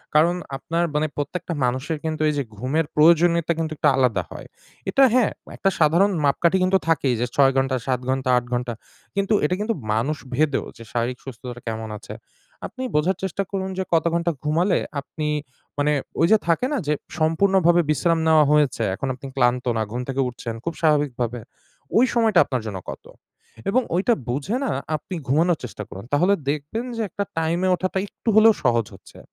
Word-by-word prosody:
কারণ 165 +3 +5 0.2
আপনার 170 +4 -1
মানে 150 +1 +2
প্রত্যেকটা 160 +4 -3
মানুষের 130 +6 -2
কিন্তু 155 -1 -2
এই - - 0
যে 140 - 0
ঘুমের 135 +8 0
প্রয়োজনীয়তা 170 +1 +4
কিন্তু 160 -1 -2
একটা 150 - +3
আলাদা 120 -8 +2
হয়। - - -9 0.4
এটা 270 +8 +4
হ্যাঁ, 250 -3 +3 0.2
একটা 195 - +1
সাধারণ 170 +6 +4
মাপকাঠি 170 +6 +3
কিন্তু 185 +1 +4
থাকেই 140 -6 +2
যে - - +2
৬ 135 -1 +5
ঘন্টা, 130 0 +1
৭ 130 -2 +1
ঘন্টা, 130 0 0
৮ 120 - -1
ঘন্টা 120 0 -1 0.4
কিন্তু 200 +2 +1
এটা 180 - +1
কিন্তু, 220 +2 0 0.2
মানুষ 130 +8 0 0.2
ভেদেও 150 0 +1
যে 115 - -10
শারীরিক 120 +1 -1
সুস্থতা 125 -1 -8
কেমন 110 0 -4
আছে? - - -10 0.5
আপনি 260 - -8
বোঝার 170 +5 +2
চেষ্টা 190 +1 -1
করুন 190 -1 -2
যে 190 - 0
কত 165 -1 +3
ঘন্টা 170 0 +1
ঘুমালে 170 +5 +2 0.2
আপনি 150 +2 -5 0.5
মানে 145 +1 +2 0.3
ওই 165 - +5
যে 220 - +7
থাকে 170 +8 +2
না? - - +1
যে 150 - +3 0.3
সম্পূর্ণভাবে 175 +2 +3
বিশ্রাম 165 +3 +2
নেওয়া 160 -1 +6
হয়েছে, 145 -6 +2
এখন 135 - -4
আপনি 130 +2 -11
ক্লান্ত 125 -1 +2
না, - - 0
ঘুম 120 +2 -3
থেকে 135 0 0
উঠছেন 120 -1 -6
খুব 170 - -3
স্বাভাবিকভাবে। 135 -7 +1 0.6
ওই 240 - +6
সময়টা 225 -6 +4
আপনার 130 -3 -2
জন্য 105 -3 -4
কতো? - - -9 0.6
এবং 255 +6 +3
ওইটা 195 +7 +3 0.2
বুঝে 145 - -1
না, - - 0 0.2
আপনি 155 +5 -6
ঘুমানোর 160 +5 +3
চেষ্টা 115 -3 -6
করুন। 95 - -9
তাহলে 180 +7 +4 0.2
দেখবেন 150 - -3
যে - - -1
একটা 200 - -3 0.2
টাইমে 170 +3 0
ওঠাটা 185 +1 -2
একটু 225 - -5
হলেও 220 +1 +7
সহজ 115 -4 +2
হচ্ছে। - - -15
155 Hz, 180 wpm, -23 LUFS, 130-175 Hz, 0.6 s, যে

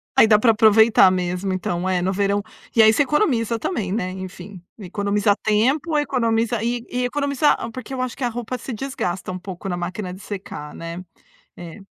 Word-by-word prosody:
Aí, - - +7
dá 215 -1 +6
para 230 +1 +5
aproveitar 220 -2 +6
mesmo. 180 +1 -2
Então 180 -1 -2
é 180 -1 +1
no 190 +2 0
verão. 200 +1 +1 0.3
E 230 - +7
aí, 220 0 +6
você 225 - +2
economiza 255 - +1
também, 220 - -3
né, 190 -3 -2
enfim. 185 0 -9 0.2
Economiza 205 +1 0
tempo, 275 +9 +1
economiza 230 -5 0
e 240 0 -2
e 250 0 -2
economiza 280 +2 +1
a - - -5
porque 255 +1 -8
eu 255 - -3
acho 255 -1 -3
que 270 - -6
a 245 - +1
roupa 240 +1 -5
se 255 - -6
desgasta 210 -8 -4
um 185 - -5
pouco 185 0 -8
na 180 - -2
máquina 180 +2 -4
de 185 - -11
secar, 190 -8 -7
né. 170 +2 -7 0.5
É. 175 +2 -10
215 Hz, 195 wpm, -22 LUFS, 185-245 Hz, 0.5 s, Aí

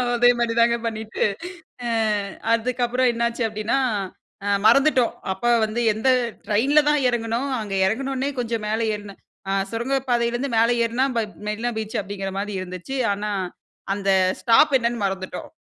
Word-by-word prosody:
அதே 245 +1 +5
மாரி 235 -1 +1
தாங்க 235 0 +4
பண்ணிட்டு, 220 -1 -3 0.6
ஆ - - -1 0.7
அதுக்கப்புறம் 245 +2 +1
என்னாச்சி 235 +1 -1
அப்டின்னா, 215 +4 -1 0.7
அ, - - -2 0.2
மறந்துட்டோம். 260 +1 +4 0.2
அப்ப 190 +5 -8 0.2
வந்து 215 +2 -3
எந்த 220 +5 0 0.4
ட்ரெயின்ல 260 +8 +3
தான் 295 -1 +3
எறங்குனோம் 235 +3 -1
அங்க 205 -2 -5
எறங்கின 265 +7 -1
உடனே 265 +2 -1
கொஞ்சம் 230 -2 -2
மேல 220 +1 0 0.2
ஏறின, 205 -1 -9 0.3
ஆ - - 0 0.2
சுரங்கப்பாதைலயிருந்து 240 +1 0
மேல 230 +1 +4 0.2
ஏறுனா, 235 +3 +1
மெ 225 - +2 0.2
மெரினா 225 +3 -2
பீச் 220 -1 -3
அப்டீங்கிற 195 -1 -5
மாரி 205 +1 -3
இருந்துச்சி. 185 +8 -6 0.2
ஆனா, 210 +1 -4 0.7
அந்த 200 -1 -2 0.3
ஸ்டாப் 270 +5 +5
என்னன்னு 235 -2 -1
மறந்துட்டோம். 190 -1 -4
230 Hz, 140 wpm, -23 LUFS, 210-245 Hz, 0.7 s, அதே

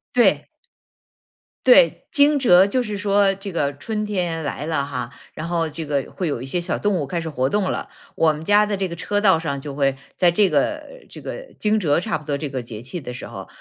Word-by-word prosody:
对。 - - +3 1.2
对， - - +5
惊 290 +1 +5
蛰 190 -7 +6
就 250 +5 0
是 210 -3 -4
说 200 0 +3
这 195 -1 -7
个 145 -4 0
春 215 +7 -3
天 175 -6 -2
来 145 0 -4
了 155 -3 -1
哈， 125 -4 -5 0.2
然 155 +2 -5
后 170 -2 0
这 160 +1 -6
个 145 -2 -2
会 180 - -3
有 140 -6 -2
一 - - -5
些 135 +7 -1
小 175 - -2
动 205 0 0
物 145 -5 -2
开 170 +4 -2
始 165 - -4
活 130 -3 0
动 205 +1 0
了。 - - -4 0.3
我 160 -1 +3
们 150 +1 -7
家 205 +4 +4
的 210 -1 -1
这 190 -1 -2
个 170 - -7
车 205 +4 -1
道 190 -6 +5
上 140 -4 -3
就 145 0 -6
会 135 -1 +1 0.2
在 180 - +5
这 195 +3 +3
个 - - +1 0.3
这 - - -10
个 - - -6
惊 215 0 +1
蛰 155 -4 +2
差 160 - -1
不 155 - -15
多 145 -1 -1
这 150 0 -4
个 130 -2 -3
节 115 -2 -8
气 130 +9 -6
的 125 -5 -7
时 120 - -7
候， - - -9
170 Hz, 255 characters per minute, -22 LUFS, 145-205 Hz, 1.2 s, 蛰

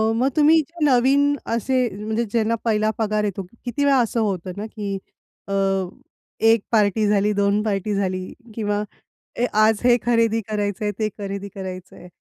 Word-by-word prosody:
मग 250 +3 +2
तुम्ही 310 +1 +5
जे 325 +1 -3
नवीन 280 +2 +4 0.2
असे 255 +2 +1
म्हणजे 220 +3 -2
ज्यांना 230 0 +1
पहिला 215 -1 +2
पगार 215 -1 0
येतो 200 -2 -2
किती 245 +4 -3
वेळा 280 -1 +4
असं 235 -1 0
होतं 190 -4 -2
ना, 205 - -4
की 205 -3 -4 0.5
अ, 195 - -3 0.9
1 225 -1 +5
पार्टी 215 -1 +3
झाली, 205 0 +2
2 200 +1 +2
पार्टी 210 -1 -1
झाली 185 -2 -2 0.2
किंवा 210 -1 -1 0.6
ए 245 - +3
आज 215 0 +4
हे 245 -1 +5
खरेदी 230 -1 +2
करायचंय, 205 0 -1
ते 215 - +1
खरेदी 200 -1 -5
करायचं 185 -1 -7
आहे. - - -13
215 Hz, 160 wpm, -22 LUFS, 200-235 Hz, 0.9 s, तुम्ही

